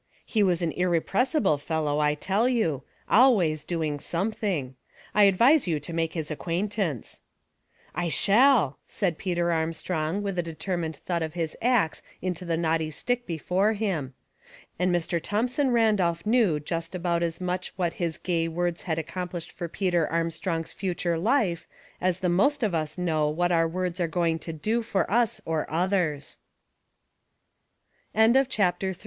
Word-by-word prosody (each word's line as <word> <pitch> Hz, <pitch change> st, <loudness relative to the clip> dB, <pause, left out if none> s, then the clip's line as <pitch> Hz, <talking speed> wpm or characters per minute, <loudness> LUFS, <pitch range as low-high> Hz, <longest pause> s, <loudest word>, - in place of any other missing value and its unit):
He 220 Hz, -, 0 dB
was 180 Hz, -3 st, +2 dB
an 165 Hz, -, 0 dB
irrepressible 185 Hz, -, +1 dB
fellow, 150 Hz, -1 st, -1 dB
I 150 Hz, 0 st, +2 dB
tell 200 Hz, +10 st, +1 dB
you; 165 Hz, -, 0 dB, 0.3 s
always 195 Hz, -, +4 dB
doing 155 Hz, -3 st, -2 dB
something. 175 Hz, -, -2 dB, 0.4 s
I 210 Hz, -1 st, +6 dB
advise 235 Hz, +8 st, +5 dB
you 160 Hz, -3 st, 0 dB
to 150 Hz, +4 st, -8 dB
make 165 Hz, -1 st, -1 dB
his 160 Hz, -2 st, -4 dB
acquaintance." 175 Hz, -, -2 dB, 0.4 s
" -, -, -34 dB
I 170 Hz, -, 0 dB
shall," 215 Hz, -, +4 dB
said 180 Hz, -6 st, -1 dB
Peter 175 Hz, -2 st, 0 dB
Armstrong, 160 Hz, +2 st, -1 dB
with 195 Hz, -3 st, -2 dB
a -, -, +4 dB
de 165 Hz, -2 st, -7 dB
termined 165 Hz, -1 st, -3 dB
thud 170 Hz, +3 st, -3 dB
of 160 Hz, +1 st, -4 dB
his 165 Hz, -2 st, -2 dB
axe 235 Hz, -10 st, +2 dB, 0.2 s
into 180 Hz, 0 st, -4 dB
the 165 Hz, -1 st, 0 dB
knotty 160 Hz, -1 st, 0 dB
stick 245 Hz, +10 st, -2 dB
be 165 Hz, -2 st, -3 dB
fore 190 Hz, +7 st, +1 dB
him; 175 Hz, -12 st, -2 dB, 0.6 s
and 180 Hz, 0 st, +2 dB
Mr. 170 Hz, -1 st, 0 dB
Thomson 250 Hz, -, 0 dB
Randolph 210 Hz, -8 st, +2 dB
knew 215 Hz, -9 st, +3 dB
just 165 Hz, +3 st, -4 dB
about 170 Hz, -1 st, 0 dB
as 165 Hz, -1 st, -2 dB
much 180 Hz, 0 st, -3 dB
what 175 Hz, -3 st, -1 dB
his 165 Hz, -2 st, -1 dB
gay 170 Hz, -2 st, -1 dB
words 175 Hz, +1 st, -2 dB
had 160 Hz, -3 st, -2 dB
accomplished 175 Hz, +1 st, -5 dB
for 175 Hz, -, -5 dB
Peter 175 Hz, -2 st, 0 dB
Armstrong's 165 Hz, 0 st, -2 dB
future 175 Hz, -3 st, -1 dB
life 195 Hz, -5 st, +1 dB, 0.3 s
as 185 Hz, 0 st, 0 dB
the 185 Hz, -, +1 dB
most 245 Hz, +11 st, +2 dB
of 210 Hz, -5 st, +1 dB
us 155 Hz, -1 st, -2 dB
know 160 Hz, -4 st, +1 dB
what 175 Hz, +3 st, 0 dB
175 Hz, 135 wpm, -26 LUFS, 160-195 Hz, 0.6 s, I